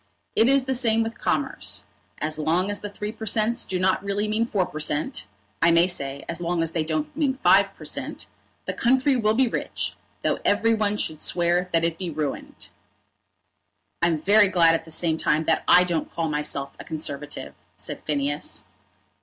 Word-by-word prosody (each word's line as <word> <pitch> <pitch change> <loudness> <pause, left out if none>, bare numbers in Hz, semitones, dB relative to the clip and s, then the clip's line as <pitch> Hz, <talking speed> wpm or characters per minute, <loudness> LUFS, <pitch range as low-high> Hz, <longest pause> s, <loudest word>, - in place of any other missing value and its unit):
It 225 +3 +4
is 275 -1 +3
the 265 - 0
same 230 -3 +3
with 225 +1 -6
commerce. - - 0 0.4
As 155 0 -1
long 170 +6 +1
as 205 - -3
the 205 - -6
Three 210 +1 -5
per 220 0 -8
Cents. 220 +3 +1
do 185 - -3
not 190 +1 +1
really 200 +1 -1
mean 220 +2 0
Four 195 -5 0
per 155 - -7
Cent., 150 -4 -1 0.3
I 165 - +5
may 170 +1 +5
say 140 -6 -2
as 170 +1 -3
long 170 -1 0
as 165 - -1
they 165 -1 -1
don't 155 -1 -3
mean 285 -4 +1
Five - - +5
per - - -12
Cent., - - -3 0.4
the - - -3
country 260 +3 +2
will 215 -3 +2
be 260 +1 +3
rich, - - -2 0.3
though - - 0
every 225 +3 +3
one 210 -1 0
should 155 -6 -1
swear 175 +1 +1
that 165 0 +2
it 165 -1 -1
be 185 -2 -3
ruined." 150 -3 -5 1.3
"I'm 170 -2 +2
very 205 +5 +5
glad, 170 -3 +4
at 165 0 -1
the - - -13
same 160 0 +1
time, 150 +1 +1
that 160 - +1
I 180 - +7
don't 170 -3 -2
call 165 -1 -2
myself 150 -2 -2
a - - -7
Conservative," 150 -2 -5 0.2
said - - -6
Phineas. 145 0 -1
175 Hz, 195 wpm, -24 LUFS, 155-215 Hz, 1.3 s, I